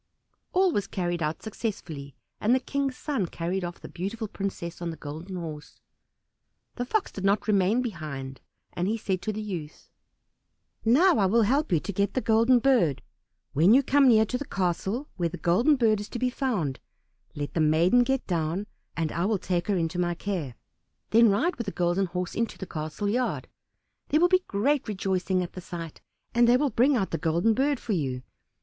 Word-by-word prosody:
All 370 0 +3
was 205 -9 -1
carried 175 -2 -2
out 155 +1 -2
successfully, 170 - -5 0.2
and 230 +4 +3
the - - +2
King's 275 0 -2
son 275 - -2
carried 175 +3 -3
off 175 0 -5
the - - -9
beautiful 215 +5 -4
princess 190 -4 -5
on 170 - -2
the 165 - -6
Golden 160 +6 -7
Horse. 155 -4 -7 0.9
The 245 - -3
Fox 415 - 0
did 195 - -7
not 200 +2 +2
remain 210 +4 +3
behind, 145 - -6 0.3
and 175 +1 -1
he 220 +3 0
said 190 -4 -2
to 215 - -2
the 215 +1 -5
youth, 170 -7 -7 0.9
"Now 310 +9 +5
I 195 - +4
will 230 +4 +4
help 275 +8 +1
you 170 - +4
to 200 - -5
get 200 +2 0
the - - +3
Golden 230 +2 +4
Bird. 235 - +2 0.5
When 175 - +5
you 275 - +5
come 280 +1 +4
near 220 -3 +6
to 250 +4 -3
the 285 - -5
castle 195 - -2
where 170 -2 0
the 180 - -7
Golden 230 - +3
Bird 225 -5 +3
is 205 0 -7
to - - -5
be 250 +1 0
found, 210 - -1 0.6
let 145 0 -4
the 165 - +1
maiden 165 +10 +4
get 265 +1 0
down, 170 +2 -1 0.3
and 160 -2 -1
I 170 - -1
will 215 0 +1
take 180 -1 -2
her 200 -2 +1
into 170 +1 -1
my 175 -1 0
care. 170 -10 -4 0.6
Then 230 0 +6
ride 255 - +1
with 235 - -3
the 200 - -3
Golden 175 +2 +1
Horse 180 0 -4
into 230 -4 -2
the 190 - -6
castle 155 +4 -4
yard; 245 +4 -1 0.6
there 305 - +3
will 355 +2 +5
be 370 0 +3
great 260 +8 +1
rejoicing 190 -2 0
at 175 - -7
the 185 - -7
sight, 170 -3 -8 0.3
and 240 0 +5
they 245 - +6
will 285 0 +1
bring 260 +6 +3
out 195 -4 -1
the 165 - -2
Golden 170 +7 +2
Bird 275 +3 +1
for 220 - -3
you. 130 -7 -2
200 Hz, 200 wpm, -27 LUFS, 170-240 Hz, 0.9 s, near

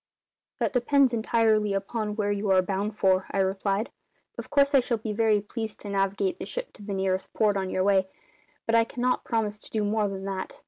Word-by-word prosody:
"That - - -1
depends 260 +1 +3
entirely 220 -2 +2
upon 210 +2 -3
where 205 -1 0
you 205 0 -1
are 185 -1 +5
bound 200 +3 -2
for," 190 -1 +2
I - - -3
replied. 195 +2 0 0.4
"Of - - -8
course 280 0 +3
I 275 - +7
shall 245 -2 -1
be 215 0 -4
very 215 -1 +3
pleased 220 +1 -6
to 205 - -7
navigate 200 - 0
the - - -5
ship - - -6
to - - -15
the 200 -1 -4
nearest 190 -1 -1
port 210 -2 +2
on 190 -1 -2
your 185 - 0
way, 190 -1 +3 0.6
but 225 - -1
I 230 0 +6
cannot 250 +2 -1
promise 215 -3 -1
to - - -13
do 215 -1 -1
more 210 0 +1
than 195 -1 -5
that. 195 -1 -5
210 Hz, 215 wpm, -27 LUFS, 195-230 Hz, 0.6 s, I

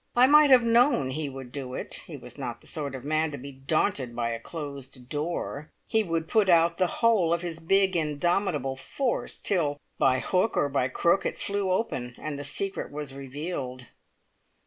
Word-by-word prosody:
I 245 +1 +7
might 300 +2 +7
have 255 -3 +7
known 230 - +3
he 150 +1 -3
would 135 -2 -9
do 130 -2 -5
it! - - -5
He - - -7
was - - -11
not - - -5
the - - -17
sort 140 -3 -3
of 130 - -8
man 155 +2 +1
to - - -4
be 140 +2 -8
daunted 135 -1 -1
by 115 -1 -1
a 115 - -3
closed 140 -3 -8
door. 150 -1 -3 0.2
He 220 - +3
would 165 -3 -2
put 205 +3 +3
out 170 0 +4
the 185 - +4
whole 215 -6 +2
of 170 +1 +1
his 165 -2 -4
big, 190 +3 +2
indomitable 155 -2 0
force, 245 - -2
till 150 -7 0 0.2
by 130 -1 +4
hook 185 +4 +1
or 145 - +2
by 135 -2 +1
crook 170 +7 +2
it - - -2
flew 200 -1 -1
open, 130 - -1
and 150 -2 -5
the - - -4
secret 195 +7 -3
was 145 -2 -5
revealed. 135 -2 -6
155 Hz, 190 wpm, -27 LUFS, 135-185 Hz, 0.2 s, I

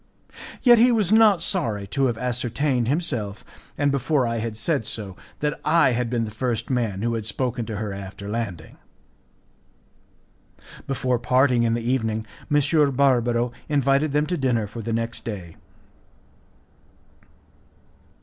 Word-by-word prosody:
Yet 240 -3 +7
he 245 +2 +6
was 210 -5 +1
not 215 -5 +5
sorry 115 - -1
to 135 +3 +1
have 120 -3 -2
ascertained 125 +1 -1
himself, 125 - -2 0.3
and 145 0 +2
before 140 0 +1
I 115 0 -1
had 110 -1 -4
said 110 0 -1
so, 100 -4 -5 0.3
that 150 0 -1
I 160 -3 +4
had 120 0 -1
been 115 -2 0
the 105 - -7
first 120 +2 -2
man 110 -6 -1
who 115 0 0
had 115 -2 -2
spoken 120 +1 -2
to 110 - -4
her 105 -1 -4
after 100 +1 -8
landing. 105 -7 -5 2.1
Before 125 -2 0
parting 125 0 +3
in 115 -1 +2
the 120 - -3
evening, 110 -4 0 0.3
M. 145 0 +3
Barbaro 120 -3 +2 0.2
invited 140 +1 +2
them 150 +1 +2
to 175 +2 -2
dinner 125 -6 +1
for 105 +3 -7
the 115 +1 -4
next 115 +1 -3
day. 95 -8 -7
120 Hz, 145 wpm, -23 LUFS, 110-140 Hz, 2.1 s, Yet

